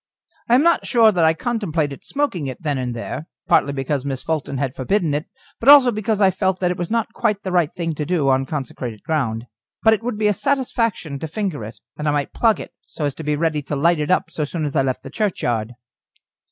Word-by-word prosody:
I 240 Hz, -, +6 dB
am 265 Hz, -, +4 dB
not 340 Hz, 0 st, +3 dB
sure 230 Hz, -3 st, +5 dB
that 175 Hz, -4 st, +1 dB
I 160 Hz, 0 st, +4 dB
contemplated 165 Hz, -, -2 dB
smoking 275 Hz, -, -1 dB
it 130 Hz, +5 st, -7 dB
then 145 Hz, -3 st, -1 dB
and 125 Hz, -2 st, -3 dB
there, 135 Hz, +7 st, -5 dB, 0.2 s
partly 140 Hz, -, +3 dB
because 135 Hz, 0 st, -2 dB
Miss 135 Hz, -2 st, -4 dB
Fulton 150 Hz, -4 st, -2 dB
had 135 Hz, -2 st, -1 dB
forbidden 160 Hz, +4 st, 0 dB
it, 150 Hz, +3 st, -2 dB, 0.3 s
but 245 Hz, -, +3 dB
also 280 Hz, -4 st, +9 dB
because 215 Hz, -1 st, -1 dB
I 195 Hz, -2 st, +5 dB
felt 190 Hz, 0 st, 0 dB
that 180 Hz, -1 st, +1 dB
it 180 Hz, -, -3 dB
was 175 Hz, -1 st, -3 dB
not 230 Hz, -1 st, -1 dB
quite 210 Hz, -3 st, 0 dB
the 190 Hz, -, -3 dB
right 175 Hz, -4 st, +2 dB
thing 165 Hz, -2 st, -3 dB
to 150 Hz, -, -3 dB
do 155 Hz, -3 st, 0 dB
on 135 Hz, 0 st, +2 dB
consecrated 125 Hz, -6 st, -5 dB
ground. 120 Hz, -8 st, -1 dB, 0.4 s
But 220 Hz, -1 st, +6 dB
it 220 Hz, -, -1 dB
would 235 Hz, -2 st, -3 dB
be 215 Hz, -, 0 dB
a 210 Hz, -, +3 dB
satisfaction 230 Hz, -, -1 dB
to 160 Hz, -, -4 dB
finger 170 Hz, -, -3 dB
it, 110 Hz, +2 st, -9 dB, 0.2 s
and 150 Hz, -, -2 dB
I -, -, +3 dB
might 145 Hz, -2 st, -1 dB
plug 225 Hz, -4 st, +3 dB
it, -, -, -9 dB
so 150 Hz, -, -4 dB
as 145 Hz, -, -1 dB
to 160 Hz, -, -8 dB
be 150 Hz, 0 st, 0 dB
ready 155 Hz, -1 st, 0 dB
to 145 Hz, +1 st, -4 dB
light 155 Hz, +1 st, +2 dB
up 185 Hz, -, +1 dB
so 155 Hz, -, -2 dB
soon 155 Hz, +1 st, -3 dB
as 145 Hz, -, -4 dB
I 140 Hz, -, +4 dB
left 130 Hz, -1 st, -2 dB
the -, -, -9 dB
churchyard. 120 Hz, -, -1 dB
160 Hz, 240 wpm, -21 LUFS, 140-210 Hz, 0.4 s, also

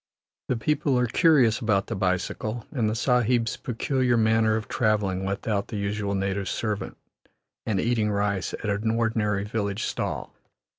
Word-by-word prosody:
The 125 Hz, -, 0 dB
people 140 Hz, +2 st, +1 dB
are 125 Hz, -, +3 dB
curious 125 Hz, -4 st, +4 dB
about 105 Hz, -4 st, +1 dB
the -, -, -4 dB
bicycle, 95 Hz, +4 st, -2 dB
and 115 Hz, -7 st, 0 dB
the 110 Hz, -, -1 dB
Sahib's 120 Hz, -1 st, +2 dB
peculiar 125 Hz, 0 st, 0 dB
manner 110 Hz, 0 st, +3 dB
of 110 Hz, -1 st, -3 dB
travelling 105 Hz, -4 st, 0 dB
without 100 Hz, +1 st, -1 dB
the 110 Hz, -, -5 dB
usual 100 Hz, 0 st, -2 dB
native 95 Hz, 0 st, -1 dB
servant 105 Hz, -3 st, -3 dB, 0.7 s
and 105 Hz, -4 st, +1 dB
eating 115 Hz, -2 st, +1 dB
rice 100 Hz, -2 st, -1 dB
at -, -, -9 dB
an 105 Hz, +2 st, 0 dB
ordinary 110 Hz, -3 st, 0 dB
village 105 Hz, 0 st, -2 dB
stall. -, -, -3 dB
110 Hz, 150 wpm, -26 LUFS, 100-115 Hz, 0.7 s, curious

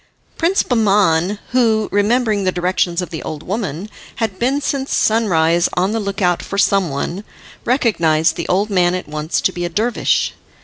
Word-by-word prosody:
Prince 350 Hz, +4 st, +1 dB
Bahman, 200 Hz, -5 st, +2 dB
who, 225 Hz, -4 st, +2 dB
remembering 210 Hz, 0 st, +1 dB
the 185 Hz, -, +1 dB
directions 180 Hz, 0 st, 0 dB
of -, -, -8 dB
the 160 Hz, -, -5 dB
old 155 Hz, -1 st, -6 dB
woman, 190 Hz, -3 st, -4 dB, 0.3 s
had 220 Hz, -5 st, -3 dB
been 265 Hz, +4 st, +1 dB
since 275 Hz, -1 st, -2 dB
sunrise 175 Hz, -6 st, +2 dB
on 185 Hz, +3 st, +1 dB
the 225 Hz, -, -1 dB
look 200 Hz, -1 st, -3 dB
out 175 Hz, -1 st, +2 dB
for 200 Hz, -, -6 dB
some 195 Hz, -3 st, +2 dB
one, 165 Hz, +8 st, -4 dB, 0.4 s
recognised 170 Hz, -, +2 dB
the 170 Hz, -, -4 dB
old 200 Hz, +4 st, 0 dB
man 180 Hz, -2 st, +2 dB
at 185 Hz, -, -5 dB
once 155 Hz, +2 st, -2 dB
to -, -, +1 dB
be 175 Hz, -1 st, -5 dB
a 175 Hz, -, -2 dB
dervish. 220 Hz, +7 st, 0 dB
195 Hz, 175 wpm, -18 LUFS, 175-220 Hz, 0.4 s, Bahman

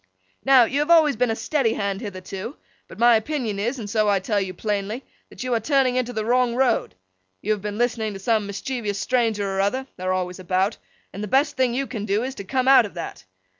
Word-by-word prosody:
'Now, 265 Hz, -2 st, +7 dB
you 265 Hz, +5 st, 0 dB
have 295 Hz, +2 st, 0 dB
always 315 Hz, -5 st, +6 dB
been 250 Hz, +2 st, +1 dB
a 225 Hz, -, 0 dB
steady 270 Hz, -3 st, 0 dB
Hand 200 Hz, -1 st, -2 dB
hitherto; 195 Hz, +4 st, -7 dB, 0.3 s
but -, -, -12 dB
my 235 Hz, +1 st, +6 dB
opinion 220 Hz, -4 st, -3 dB
is, 240 Hz, +6 st, -1 dB
and 220 Hz, -4 st, -6 dB
so 215 Hz, 0 st, +1 dB
I 200 Hz, -, +3 dB
tell 200 Hz, +2 st, 0 dB
you 190 Hz, -1 st, -3 dB
plainly, 210 Hz, +5 st, -3 dB, 0.3 s
that -, -, -8 dB
you 255 Hz, -1 st, -1 dB
are 230 Hz, -, +2 dB
turning 260 Hz, +1 st, +2 dB
into 250 Hz, -1 st, 0 dB
the 220 Hz, -3 st, -3 dB
wrong 245 Hz, 0 st, +2 dB
road. 255 Hz, -2 st, +1 dB, 0.4 s
You 215 Hz, -, -2 dB
have 210 Hz, -2 st, 0 dB
been 210 Hz, 0 st, -4 dB
listening 230 Hz, -3 st, 0 dB
to 195 Hz, -, -7 dB
some 215 Hz, 0 st, +1 dB
mischievous 210 Hz, 0 st, -3 dB
stranger 225 Hz, -4 st, 0 dB
or 195 Hz, 0 st, 0 dB
other—they're 200 Hz, -3 st, -2 dB
always 180 Hz, 0 st, -2 dB
about—and 190 Hz, +2 st, -3 dB
the -, -, -3 dB
best 275 Hz, +6 st, +2 dB
thing 255 Hz, -2 st, +1 dB
you 275 Hz, +2 st, 0 dB
can 220 Hz, -6 st, -5 dB
do 210 Hz, +2 st, 0 dB
is, 265 Hz, +1 st, -3 dB
to 200 Hz, -, -8 dB
come 255 Hz, +5 st, -1 dB
out 265 Hz, -5 st, +7 dB
of 200 Hz, -, -17 dB
that. 165 Hz, -, -7 dB
225 Hz, 225 wpm, -23 LUFS, 200-255 Hz, 0.4 s, Now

